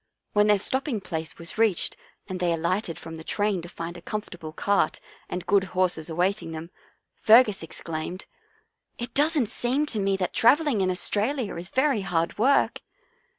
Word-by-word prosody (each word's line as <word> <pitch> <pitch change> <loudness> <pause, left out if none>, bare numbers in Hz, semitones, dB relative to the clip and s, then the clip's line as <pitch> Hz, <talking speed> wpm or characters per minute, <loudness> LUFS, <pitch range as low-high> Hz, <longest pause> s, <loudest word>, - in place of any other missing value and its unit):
When 210 0 +4
their 210 -1 +5
stopping 260 +3 -1
place 160 -4 -5
was 170 +4 -7
reached 220 -6 +2 0.3
and 185 -2 -5
they 175 -1 +1
alighted 170 +2 -1
from 165 0 -8
the 160 - -9
train 205 0 0
to 170 - -9
find 170 0 -6
a 175 - -10
comfortable 175 -6 -6
cart 185 -2 +1 0.3
and 180 - -4
good 200 -1 +3
horses 175 -3 +1
awaiting 175 +1 -1
them, 160 +2 -7 0.4
Fergus 220 -2 +5
exclaimed, 165 +2 -6 0.4
" - - -47 0.3
It 240 -1 -5
doesn't 295 -2 +3
seem 250 +7 0
to 230 -7 -1
me 195 -1 +1
that 185 -2 -2
travelling 275 -2 +4
in 185 - +2
Aus 180 0 +2
tralia 225 +1 -1
is 175 +2 -4
very 265 -3 +2
hard 170 -1 -1
work." 270 +5 +3
195 Hz, 175 wpm, -26 LUFS, 170-225 Hz, 0.4 s, their